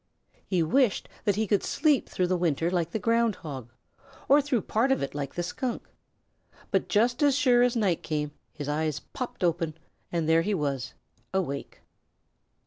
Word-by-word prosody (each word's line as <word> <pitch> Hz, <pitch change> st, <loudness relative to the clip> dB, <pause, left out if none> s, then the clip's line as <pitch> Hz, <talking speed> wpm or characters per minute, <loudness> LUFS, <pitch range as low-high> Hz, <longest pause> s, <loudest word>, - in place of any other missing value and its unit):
He 180 Hz, -4 st, +2 dB
wished 230 Hz, -, +2 dB, 0.2 s
that 205 Hz, -3 st, +3 dB
he 220 Hz, +1 st, +1 dB
could 205 Hz, -1 st, +2 dB
sleep 300 Hz, -4 st, +1 dB
through 185 Hz, -, 0 dB
the 185 Hz, +1 st, +1 dB
winter 170 Hz, -1 st, +1 dB
like 170 Hz, -3 st, 0 dB
the 200 Hz, -, -2 dB
Ground 230 Hz, -1 st, +2 dB
Hog, 130 Hz, -7 st, -8 dB, 0.6 s
or 285 Hz, +2 st, +6 dB
through 265 Hz, -6 st, 0 dB
part 235 Hz, +5 st, +1 dB
of 270 Hz, -, +2 dB
it 135 Hz, -, -4 dB
like 140 Hz, -1 st, -4 dB
the 175 Hz, -, -1 dB
Skunk, 245 Hz, +7 st, -3 dB, 0.8 s
but -, -, +1 dB
just 240 Hz, +5 st, +2 dB
as 285 Hz, -2 st, +4 dB
sure 245 Hz, -4 st, +4 dB
as 245 Hz, 0 st, +3 dB
night 200 Hz, -7 st, +1 dB
came 150 Hz, -2 st, -2 dB, 0.2 s
his 145 Hz, -, -6 dB
eyes 150 Hz, 0 st, -1 dB
popped 250 Hz, -7 st, -6 dB
open 165 Hz, -2 st, 0 dB, 0.4 s
and 165 Hz, -2 st, 0 dB
there 165 Hz, 0 st, +5 dB
he 205 Hz, +4 st, 0 dB
was 140 Hz, -5 st, -2 dB, 0.4 s
awake. 140 Hz, -7 st, -3 dB
180 Hz, 175 wpm, -27 LUFS, 155-235 Hz, 0.8 s, or